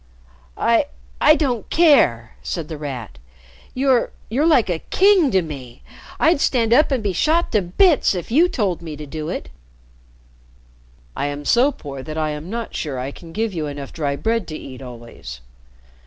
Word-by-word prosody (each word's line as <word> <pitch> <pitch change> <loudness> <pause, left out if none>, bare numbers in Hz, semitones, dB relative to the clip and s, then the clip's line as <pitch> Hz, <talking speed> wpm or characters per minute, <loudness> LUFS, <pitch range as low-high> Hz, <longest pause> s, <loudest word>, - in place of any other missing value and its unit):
"I 235 +5 +2 0.3
I 305 - +7
don't 255 -8 -1
care!" 185 - +4
said 165 -4 -4
The 160 - -5
Rat. 130 -7 -6 0.6
"You 260 -2 +2 0.2
you're 275 +8 +1
like 280 -10 +4
a 175 -3 -1
king 380 - +4
to 190 -5 +2
me. 130 -6 -9 0.4
I'd 320 -3 +3
stand 230 -3 +2
up 300 +5 +5
and 255 -5 0
be 200 -2 0
shot 320 - +1
to 210 - +3
bits 275 - +3
if 180 +4 -5
you 330 +8 +4
told 195 - -1
me 160 -3 -7
to 150 +1 -8
do 155 +1 -5
it." - - -5 1.7
"I 140 - -1
am 145 0 -5
so 250 - +4
poor 140 - -8
that 155 +3 -7
I 155 -1 0
am 150 +3 -6
not 230 +1 -5
sure 145 -5 -3
I 130 +2 -4
can 165 +3 -12
give 220 +3 -2
you 160 -3 -3
enough 145 -1 -7
dry 145 -3 -2
bread 225 +3 -1
to 155 - -6
eat 130 -1 -10
always. 115 - -10
175 Hz, 180 wpm, -21 LUFS, -, 1.7 s, I